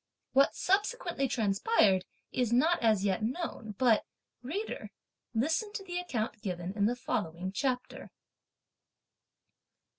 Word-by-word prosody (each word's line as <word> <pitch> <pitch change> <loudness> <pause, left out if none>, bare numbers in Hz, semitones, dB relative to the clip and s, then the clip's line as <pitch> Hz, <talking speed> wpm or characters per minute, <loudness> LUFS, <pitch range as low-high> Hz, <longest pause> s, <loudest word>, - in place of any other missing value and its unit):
What 275 +1 +5
subsequently 385 - +1
transpired 205 - +3 0.3
is 245 -3 0
not 315 +9 +3
as 215 -4 +3
yet 195 0 +1
known, 225 - -3
but, 235 -4 +4 0.4
reader, 350 - -4 0.5
listen 320 - +1
to 410 - -4
the 355 -2 -3
account 230 -11 -3
given 180 -2 -3
in 205 -1 +3
the 240 - 0
following 185 -6 -2
chapter. 250 +4 -2
245 Hz, 115 wpm, -31 LUFS, 205-330 Hz, 0.5 s, What